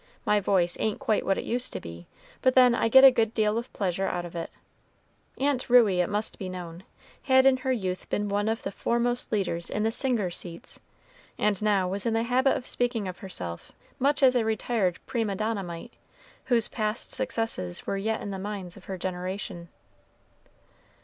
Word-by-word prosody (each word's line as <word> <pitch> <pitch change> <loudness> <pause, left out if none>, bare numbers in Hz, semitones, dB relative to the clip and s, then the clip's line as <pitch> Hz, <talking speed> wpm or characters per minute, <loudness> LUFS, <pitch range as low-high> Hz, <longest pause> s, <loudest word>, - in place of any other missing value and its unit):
My 210 - +3
voice 185 -3 +1
ain't 215 -1 0
quite 215 - 0
what 195 - +2
it - - -3
used 245 +2 -2
to - - -3
be, 85 0 -10 0.3
but 255 0 +3
then 250 -2 +7
I 235 - +1
get 265 +3 +8
a 270 - +11
good 225 -2 0
deal 215 0 +2
of 235 - -9
pleasure 190 -1 -1
out 175 -1 -2
of 175 - -10
it." 165 - -4 0.9
Aunt 270 -2 0
Ruey, 220 -7 +5
it 175 - -1
must 210 +1 -3
be 190 -3 -4
known, 175 -2 -7 0.4
had 260 -1 +4
in 270 -1 +5
her 260 0 -2
youth 185 -7 -3
been 205 0 -1
one 205 +1 0
of 225 +1 -2
the - - -3
foremost 240 +4 -1
leaders 180 -5 0
in 210 - -1
the 225 - +1
"singers' 225 -8 0
seats," 175 +6 -7 0.6
and 210 -2 +1
now 205 -3 +2
was 195 +3 -2
in 225 - +1
the 225 - +1
habit 255 +3 +2
of 250 - -8
speaking 240 -6 -1
of 180 -1 -7
herself 90 - -6 0.3
much 280 +2 +2
as 255 -1 +6
a 240 - +3
retired 220 -4 0
prima 225 -5 -1
donna 215 +1 -1
might, 170 -2 -8 0.5
whose 235 -4 +4
past 215 0 -2
successes 160 - -3
were - - -2
yet 220 +3 -2
in 200 - -5
the 190 - -5
minds 195 -3 -6
of 195 - -15
her 190 - -5
generation. 185 0 -5
210 Hz, 195 wpm, -27 LUFS, 185-235 Hz, 0.9 s, a